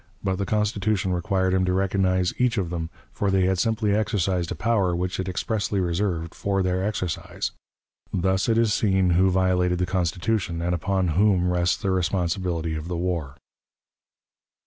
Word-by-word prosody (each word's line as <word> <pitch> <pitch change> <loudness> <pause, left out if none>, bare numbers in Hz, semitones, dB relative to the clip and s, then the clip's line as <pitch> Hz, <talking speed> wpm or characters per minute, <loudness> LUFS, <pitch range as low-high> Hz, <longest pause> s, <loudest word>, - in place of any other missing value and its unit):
But 95 -1 0
the 100 0 -2
Constitution 105 -3 0
required 95 0 0
him 95 0 +2
to 90 - +1
recognize 95 -1 +1
each 125 -1 +2
of 90 -4 -1
them, 80 -2 -3 0.2
for 100 - -1
they 95 -1 +3
had 95 -1 +1
simply 110 -1 +1
exercised 95 -5 0
a - - -2
power 100 -6 +1
which 90 +2 -2
it 95 0 -2
expressly 100 +2 -1
reserved 85 -2 -1
for 100 -1 -1
their 90 0 0
exercise. 95 -5 -3 0.6
Thus 95 +3 +1
it 115 - +3
is 115 -2 +3
seen 95 -4 +2
who 95 +2 +4
violated 90 -1 +2
the 90 - 0
Constitution, 90 +1 -1
and 85 +1 -1
upon 95 +1 0
whom 90 +1 +3
rests 90 0 +1
the 95 - -1
responsibility 90 -2 -1
of 80 +1 -5
the 90 -1 -3
war. 85 -6 -2
95 Hz, 170 wpm, -24 LUFS, 90-100 Hz, 0.6 s, who